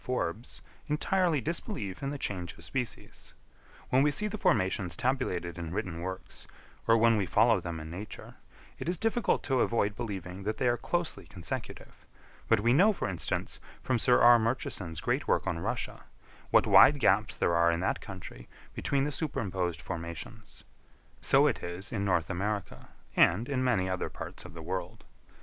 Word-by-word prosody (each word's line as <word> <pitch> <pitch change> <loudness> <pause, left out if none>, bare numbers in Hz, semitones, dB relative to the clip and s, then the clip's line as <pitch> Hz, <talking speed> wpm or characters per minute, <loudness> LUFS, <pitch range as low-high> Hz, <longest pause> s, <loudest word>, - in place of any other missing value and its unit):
Forbes, 115 -2 -3 0.2
entirely 165 0 +1
disbelieve 110 - -4
in 140 - -2
the 145 - -4
change 90 -9 -3
of - - -12
species. 125 -4 -5 0.6
When 130 - +5
we 150 - +4
see 145 +9 +1
the 210 - -4
formations 95 -2 +1
tabulated 90 - -1
in 85 -2 -5
written 85 -2 -3
works, 95 +1 -7 0.4
or 115 - +6
when 115 0 +4
we 100 -3 0
follow 110 +1 +4
them 85 -1 -5
in 80 +1 -8
nature, 100 +4 -8 0.5
it - - -3
is 180 - +2
difficult 225 +3 +1
to 135 -2 +1
avoid 105 -3 +1
believing 95 -5 -5
that 105 +3 -2
they 125 - +1
are 120 - +3
closely 175 +7 -2
consecutive. 90 -4 -7 0.4
But 115 -3 +3
we 120 +2 +3
know, 195 +10 +5
for 185 - -3
instance, 95 -4 -2 0.2
from 130 -2 +1
Sir 125 +1 +4
R. 120 0 +8
Murchison's 100 -8 -2
great - - -1
work - - +2
on 80 - -1
Russia, - - -3 0.4
what - - +5
wide 145 +1 +7
gaps 100 -3 +3
there 85 - +1
are 85 0 +4
in 85 +1 -1
that 95 - -1
country 90 -11 -10 0.2
between 140 -1 0
the 150 - -1
superimposed 95 - -2
formations; 85 -2 -7 0.6
so - - +5
it - - +1
is 90 +4 -5
in 100 -4 -2
North 90 -5 +1
America, 100 +2 -3 0.3
and 105 +8 +4
in 130 -2 -1
many 95 -8 +2
other 95 -1 -2
parts - - -8
of 85 -2 -11
the 85 - -8
world. 90 +3 -5
105 Hz, 175 wpm, -30 LUFS, 90-130 Hz, 0.6 s, R